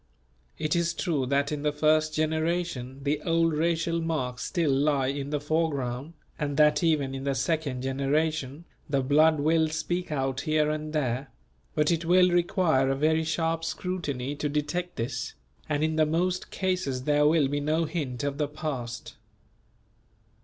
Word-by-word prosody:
It 155 +1 0
is 170 -1 +1
true 155 -7 -1
that 140 +2 +1
in 150 -1 -3
the 150 0 +1
first 155 +1 +2
generation, 155 -4 -1
the 145 +1 0
old 165 0 +2
racial 165 +1 0
marks 130 -7 -2
still 170 -6 0
lie 140 0 +2
in 140 0 -3
the 150 0 -1
foreground, 145 -2 -1 0.3
and 145 -2 -2
that 150 +2 +5
even 150 -5 +1
in 135 0 -5
the 140 -1 0
second 135 -2 -1
generation, 140 +2 -1 0.2
the 140 -2 +1
blood 155 +3 +4
will 160 +2 +3
speak 175 +2 -2
out 135 -2 -1
here 155 -1 +1
and 155 0 -4
there; 135 -3 -1 0.5
but 150 +2 +2
it 170 0 0
will 180 +1 +5
require 175 -6 +2
a 135 - +1
very 160 +3 +2
sharp 165 0 -1
scrutiny 150 -6 -3
to 150 0 -1
detect 150 +5 -2
this, 115 0 -4 0.3
and 150 0 0
in 160 0 0
the 155 - +5
most 180 +3 0
cases 185 -9 -1
there 150 +1 +3
will 155 -2 +4
be 145 +1 -1
no 155 +3 +1
hint 145 -7 -3
of 140 0 -2
the 150 - +1
past. 125 -7 -5
150 Hz, 165 wpm, -27 LUFS, 140-165 Hz, 0.5 s, that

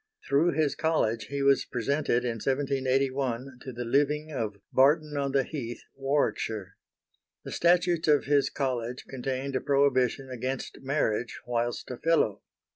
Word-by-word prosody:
Through 160 +5 +3
his 155 -3 +1
College 115 -9 0
he 140 0 -3
was 140 0 +4
presented 125 0 0
in 115 -2 -2
1781 135 -2 0
to 130 - -7
the 120 0 -5
living 145 +5 +1
of 110 -7 -3 0.2
Barton 150 +3 +4
on 140 -1 -1
the 135 0 +3
heath, 120 -5 -6
Warwickshire. 125 -8 -1 0.7
The - - -7
Statutes 175 -1 +2
of 150 -2 +4
his 145 0 +3
College 125 -3 -3
contained 135 +1 -3
a 130 - 0
prohibition 135 -2 +2
against 130 +1 -4
marriage 130 -5 -1
whilst 120 +1 -2
a 125 - -5
Fellow. 160 -11 +2
135 Hz, 140 wpm, -28 LUFS, 125-145 Hz, 0.7 s, was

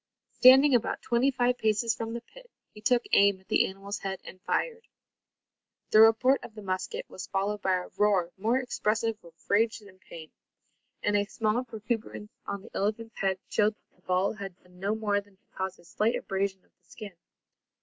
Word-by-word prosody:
Standing 265 +2 +7
about 235 -2 +1
twenty 240 +3 +2
five 250 -1 +1
paces 220 +1 +1
from 225 0 -5
the 235 - -4
pit, - - -17 0.2
he 210 - -13
took 245 +2 +3
aim 200 -1 +5
at 190 - -26
the - - +3
animal's 195 +1 -6
head 190 -1 -4
and 185 - -12
fired. 465 -1 -2 1.0
The 215 - +7
report 225 +5 +5
of 220 - -10
the 215 - -9
musket 185 -1 -3
was 185 - -8
followed 200 +1 -1
by 190 -1 +2
a 180 0 -4
roar 195 -5 +2
more 225 +6 +1
expressive 225 -3 -1
of 170 -1 -16
rage 220 +3 +2
than 200 -3 -16
pain, 160 -4 -11 0.7
and 205 - +1
a 205 0 +2
small 215 +3 -1
protuberance 220 -2 -5 0.2
on 200 -1 -4
the 230 - -14
elephant's 225 +3 -2
head 190 -1 +1
showed 210 0 +2
that - - -40
the - - -30
ball 185 +2 +1
had 195 -4 -8
done 180 0 -20
no 200 +3 0
more 205 -2 0
than 200 -1 -25
to - - -44
cause 190 0 -4
a - - -20
slight 215 +6 0
abrasion 195 -1 -2
of - - -35
the - - -35
skin. 210 -4 -9
210 Hz, 195 wpm, -28 LUFS, 195-230 Hz, 1.0 s, Standing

